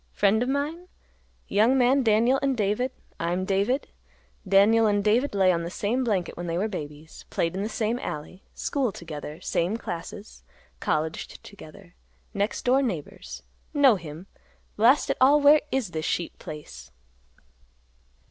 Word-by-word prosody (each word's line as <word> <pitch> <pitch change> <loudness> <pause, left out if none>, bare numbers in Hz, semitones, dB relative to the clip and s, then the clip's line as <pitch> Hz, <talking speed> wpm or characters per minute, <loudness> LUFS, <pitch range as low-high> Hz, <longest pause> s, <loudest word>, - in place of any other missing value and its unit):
Friend 205 +2 +2
of 250 - 0
mine? 300 +6 -2 0.6
Young 225 +6 +3
man 260 +2 +4
Daniel 235 +3 +3
and 275 -2 0
David, 210 +5 0 0.3
I 170 +1 -1
am 185 +1 -1
David; 200 +8 0 0.6
Daniel 210 +4 +5
and 205 -1 +1
David 225 +4 +2
lay 190 -2 +4
on 170 -1 0
the 170 - -4
same 220 +8 -1
blanket 200 -7 -1
when 175 0 -6
they 165 0 -2
were 200 +4 0
babies; 155 -5 -8
played 165 +2 -1
in 195 - -2
the 210 - -2
same 225 +2 -1
alley; 150 +3 -6
school 270 -6 -1
together 155 -3 -8
same 180 +4 -1
classes; 200 +2 -8 0.4
colleged 155 +1 -3
together; 185 -2 -14 0.4
next 205 +1 -2
door 260 +2 +4
neighbors. 185 - -5 0.3
Know 275 -5 +6
him! 165 -1 -9 0.5
Blast 245 +7 +4
it - - -2
all, 280 +3 +6
where 295 +1 +6
is 255 -9 -1
this 155 -1 -4
sheep 170 +2 -2
place?" 70 - -10
205 Hz, 155 wpm, -26 LUFS, 170-250 Hz, 0.6 s, Know